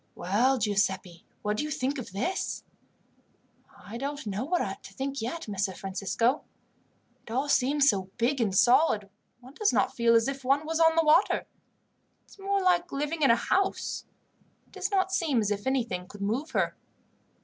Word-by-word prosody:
"Well, 235 +9 +2
Giuseppi, 195 -5 -1 0.2
what 210 0 -1
do - - -1
you 305 - -4
think 275 0 -2
of 235 - -7
this?" 250 - -2 1.1
"I 225 +4 -9
don't 285 +1 -4
know 205 +1 -3
what 350 +6 -2
to - - -13
think 275 -1 -3
yet, 320 +8 -4
Messer 200 -2 -2
Francisco. 200 +7 -1 0.8
It - - -16
all 265 +5 0
seems 280 +1 +3
so 195 -6 +2
big 245 +3 +1
and 195 -4 +1
solid 220 -6 +4 0.3
one 255 +2 -14
does 415 +6 +1
not - - +1
feel 235 -1 +4
as 230 +2 +3
if 275 -1 -4
one 275 +4 +2
was 325 +1 -2
on 325 0 +5
the 330 -1 +3
water. 310 +6 +4 0.8
It's - - -19
more 395 0 0
like 355 -1 +2
living 295 +3 -3
in 275 - +5
a 230 - +7
house. 390 +9 -1 0.6
It - - -32
does 380 0 -3
not 380 -2 +1
seem 320 -9 +1
as 210 -1 0
if 205 +3 -3
anything 230 -9 -1
could 205 +1 -12
move 240 +10 -1
her." - - 0
260 Hz, 180 wpm, -28 LUFS, 210-310 Hz, 1.1 s, a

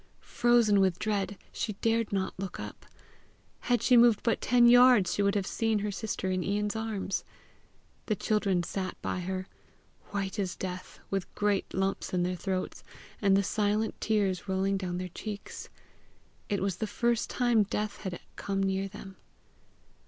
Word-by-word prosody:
Frozen 235 -4 +3
with 190 -2 +3
dread, 205 -2 -1
she 215 - -3
dared 225 +2 0
not 190 -2 -1
look 195 -2 -5
up. - - -8 0.7
Had 245 -1 0
she 250 - +5
moved 235 -3 +6
but 230 - +1
ten 245 -1 +4
yards, 245 -5 +7
she - - 0
would 200 +1 +2
have 200 -2 0
seen 225 +1 0
her 205 0 -2
sister 195 -2 -3
in 185 -1 0
Ian's 205 +2 -1
arms. 220 -3 -2 0.8
The 215 - +1
children 195 -3 +1
sat 185 +1 -4
by - - -2
her, 185 +1 -3 0.6
white 200 0 -3
as 185 -2 -1
death, 185 -1 -6
with 195 -2 -2
great 205 -2 0
lumps 190 -1 -1
in 175 - +2
their 180 +1 -1
throats, 185 0 -3 0.4
and 195 -2 +4
the 200 - +2
silent 210 +2 0
tears 205 -4 0
rolling 190 +1 +1
down 180 -2 -3
their 180 0 -4
cheeks. 205 +3 -7 0.8
It 200 -2 0
was 195 -3 -1
the 220 - -2
first 235 +1 0
time 240 -3 +3
death 210 +1 -2
had 185 -3 -5 0.2
come 195 -1 -2
near 195 0 0
them. 195 -1 -11
200 Hz, 165 wpm, -29 LUFS, 190-215 Hz, 0.8 s, yards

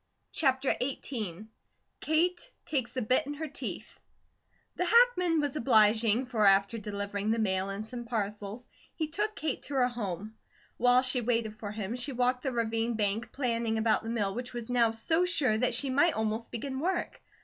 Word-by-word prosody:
CHAPTER 265 -2 +1
XVIII 220 -7 -4 0.5
KATE 345 +7 0 0.2
TAKES 255 -6 -2
THE 255 - -1
BIT 255 +5 +2
IN 290 - -3
HER 315 +2 -4
TEETH 290 - -7 0.8
THE 360 - 0
hackman 365 -6 +4
was 290 -2 -1
obliging, 225 -2 +4
for 235 -4 0
after 200 +3 +4
delivering 205 0 -3
the 225 - +2
mail 190 -3 0
and 200 +2 -4
some 240 +1 -7
parcels, 210 0 -4 0.3
he 315 - -2
took 420 +6 -2
Kate 305 -4 -2
to 285 - -6
her 250 -2 +3
home. 215 -3 -5 0.4
While 245 +1 +4
she 255 -1 +2
waited 225 -2 -1
for 210 - -5
him, 210 +1 -4
she 250 +3 -4
walked 250 +1 +1
the 265 - -2
ravine 230 0 0
bank 215 +2 -1
planning 230 -4 -1
about 220 -1 +2
the 225 - -6
mill 210 -4 -1
which 245 +2 -6
was 240 0 -5
now 235 -2 +4
so 320 +10 +1
sure 295 -10 +2
that 240 +1 +1
she 270 +2 -1
might 295 +5 +3
almost 220 +1 -2
begin 265 +3 -4
work. 355 +4 -2
240 Hz, 180 wpm, -30 LUFS, 215-270 Hz, 0.8 s, hackman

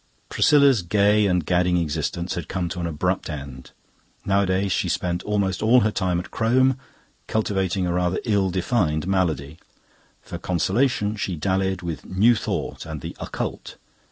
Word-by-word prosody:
Priscilla's 140 -6 +4
gay 105 +3 +3
and 90 -4 +1
gadding 90 0 +2
existence 85 +2 -2
had 85 -2 -5
come 90 -2 -2
to 90 +2 -5
an 85 - -2
abrupt 90 +4 -2
end. 70 -4 -7 0.6
Nowadays 100 0 +1
she - - 0
spent 90 0 -1
almost 100 -3 -1
all 120 +3 +5
her 110 - +1
time 90 -4 0
at 90 - -8
Crome, 130 +3 +2 0.5
cultivating 95 -4 0
a 90 - -1
rather 90 0 0
ill 100 -4 +2
defined 90 -4 0
malady. 80 -6 -1 0.6
For - - -8
consolation 105 - 0
she 95 -3 -2
dallied 95 +2 -1
with 80 -6 -5
New 105 +6 +3
Thought - - -3
and 80 -3 -6
the - - -7
Occult. - - -5
95 Hz, 155 wpm, -23 LUFS, 85-105 Hz, 0.6 s, all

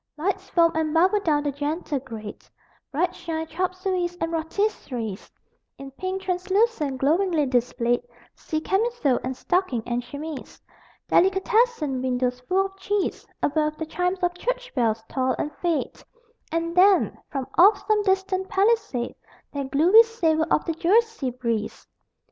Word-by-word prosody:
Lights 385 +4 -2
foam 335 -1 +4
and 315 0 -1
bubble 370 +5 +4
down 305 -6 +1
the 290 - 0
gentle 290 +1 -2
grade: 220 -4 -9 0.5
Bright 325 +5 0
shine 320 -1 -4
chop 365 +3 -2
sueys 365 -2 -2
and 330 0 -2
rôtisseries; 315 - -3 0.5
In 275 0 -9
pink 375 +6 -4
translucence 370 - 0
glowingly 325 +2 +2
displayed 245 -1 +1 0.3
See 310 0 -4
camisole 385 - +1
and 255 0 -4
stocking 355 - 0
and 240 0 -1
chemise. 290 +3 -8 0.5
Delicatessen 385 - +2
windows 250 -1 -1
full 370 +10 +1
of 390 0 -9
cheese 400 0 -2 0.2
Above, 305 +1 +1
the 320 - -3
chimes 360 +4 -2
of 355 0 +2
church - - -3
bells 225 -3 0
toll 260 -1 0
and 295 - -4
fade 340 -3 -2 0.5
And 335 +1 -2
then, 380 +1 +4
from 270 -3 -3
off 400 +3 +6
some 430 -1 +3
distant 380 -1 0
Palisade 405 - +1 0.4
That 280 -2 -3
gluey 345 +11 +7
savor 330 -9 +1
on - - +3
the 330 - -1
Jersey 410 - +2
breeze! 235 -3 -3
330 Hz, 140 wpm, -24 LUFS, 275-385 Hz, 0.5 s, gluey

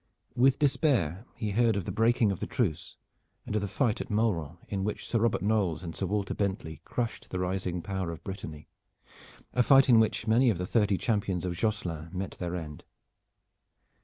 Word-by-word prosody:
With 130 +2 +4
despair 125 - +1
he 110 -4 -3
heard 115 +1 +3
of 100 -4 -2
the - - -3
breaking 115 -1 +3
of 95 - -4
the - - -3
truce, 90 -9 -2 0.5
and - - -3
of 105 - +1
the 100 - -2
fight 115 +3 0
at - - -7
Mauron 95 -8 0
in 95 -2 -2
which 105 +1 -3
Sir 115 - +1
Robert 115 -2 +1
Knolles 100 -6 +1
and 80 -2 -6
Sir 95 - -2
Walter 100 +1 -1
Bentley 95 -7 -3
crushed 115 -3 -3
the 90 - -3
rising 90 -1 -2
power 95 -3 -3
of 85 0 -7
Brittany 80 -6 -7 0.9
a 125 - +3
fight 135 +2 +6
in 115 -2 +7
which 110 0 +1
many 120 +3 +4
of 105 - +1
the 90 - -2
thirty 105 -1 +2
champions 100 -3 -1
of 90 - -1
Josselin 85 -7 -2
met 95 +1 -3
their 90 0 -4
end. 75 -4 -7
100 Hz, 190 wpm, -29 LUFS, 90-115 Hz, 0.9 s, in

